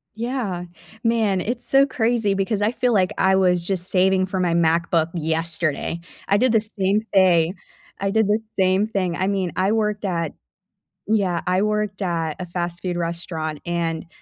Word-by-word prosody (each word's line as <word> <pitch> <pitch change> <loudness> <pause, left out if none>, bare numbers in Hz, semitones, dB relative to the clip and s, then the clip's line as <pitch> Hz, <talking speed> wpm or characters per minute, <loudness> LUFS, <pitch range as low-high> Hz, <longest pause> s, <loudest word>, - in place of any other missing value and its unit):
Yeah. 225 -7 -3 0.4
Man, 220 -5 +2
it's 240 +5 -3
so 275 0 +5
crazy 230 -5 +1
because 195 +2 -1
I 210 +2 +2
feel 250 0 0
like 185 -3 +2
I 190 0 +4
was 180 -2 +2
just 185 -1 -1
saving 185 0 +3
for 190 0 -3
my 175 -2 +1
MacBook 170 0 +2
yesterday. 165 0 -1 0.3
I 200 - +3
did 255 +3 +3
the 225 -2 +3
same 205 -1 0
thing, 180 -2 +4 0.4
I 195 0 -1
did 220 0 +2
the 210 +2 +2 0.2
same 190 +1 +3
thing. 190 -5 -1
I 185 - 0
mean, 195 -3 -1
I 190 +2 +1
worked 210 -2 0
at 170 -4 -2 0.7
yeah, 195 -5 +1
I 185 +1 +2
worked 210 -1 -1
at 165 -4 -1
a 180 - -4
fast 175 0 -4
food 180 -2 -2
restaurant, 165 -2 -4
and 170 -1 -2
185 Hz, 175 wpm, -22 LUFS, 170-210 Hz, 0.7 s, so